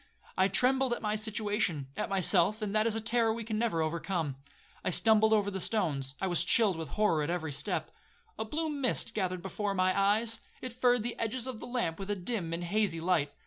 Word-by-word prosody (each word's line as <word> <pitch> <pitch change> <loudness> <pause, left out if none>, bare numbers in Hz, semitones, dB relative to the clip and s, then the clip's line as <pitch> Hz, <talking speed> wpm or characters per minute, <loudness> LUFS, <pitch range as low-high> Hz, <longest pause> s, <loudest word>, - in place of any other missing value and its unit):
I 190 0 +4
trembled 255 +5 +3
at - - -4
my 210 0 0
situation,—at 205 - -2
myself, 195 +2 +2
and 205 -1 -2
that 215 +1 +3
is 225 - 0
a 225 - -1
terror 225 0 +2
we 230 +1 -3
can 215 -1 -3
never 195 -9 +1
overcome. 165 -2 -2 0.5
I - - 0
stumbled 220 +3 +4
over 205 -2 +3
the 190 - -3
stones,—I 155 -7 -1
was 175 -2 +1
chilled 205 +1 +3
with 160 -2 -6
horror 210 -7 +3
at 150 - -2
every 165 -3 -2
step. 140 +1 -2 0.5
A - - 0
blue 310 +8 -2
mist 280 -4 0
gathered 185 -3 -2
before 200 +1 -2
my 185 0 +2
eyes,—it 220 +4 0
furred 245 -2 +2
the 240 +1 -4
edges 230 +2 -2
of 255 -4 -4
the - - -8
lamp 240 -10 -2
with 195 0 -6
a 205 - +1
dim 185 -2 -3
and 170 +1 -3
hazy 185 -1 0
light. 165 -4 +1
205 Hz, 205 wpm, -31 LUFS, 175-225 Hz, 0.5 s, I